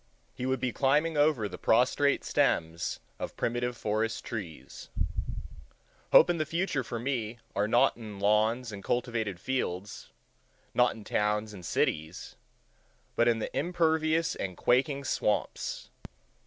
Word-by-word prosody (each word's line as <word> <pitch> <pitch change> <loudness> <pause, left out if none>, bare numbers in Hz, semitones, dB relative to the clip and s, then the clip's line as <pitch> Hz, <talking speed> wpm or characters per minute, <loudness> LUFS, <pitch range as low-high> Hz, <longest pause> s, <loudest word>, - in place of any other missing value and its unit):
He 125 - -4
would 130 0 0
be 125 - -1
climbing 150 +6 +2
over 145 -7 +3
the 100 - -9
prostrate - - +3
stems 80 0 0 0.2
of - - -6
primitive 120 +1 -1
forest 110 +2 -1
trees. 95 -9 -7 1.2
Hope - - +8
and 175 -2 0
the 155 - +1
future 165 -4 -1
for 120 0 -5
me 120 -2 -2 0.2
are 100 +1 +1
not 120 +2 +4
in 110 -4 -9
lawns 110 +4 +2
and 100 -2 -8
cultivated 115 -6 -1
fields, 100 -5 -3 0.6
not 125 0 +3
in 110 - -10
towns 105 +1 0
and 95 -3 -10
cities, 80 +1 -2 0.8
but 120 - +3
in 115 -1 +3
the 110 - -5
impervious 160 -1 +1
and 90 -3 -4
quaking 135 +3 +2
swamps. 105 -6 -1
120 Hz, 135 wpm, -29 LUFS, 105-135 Hz, 1.2 s, Hope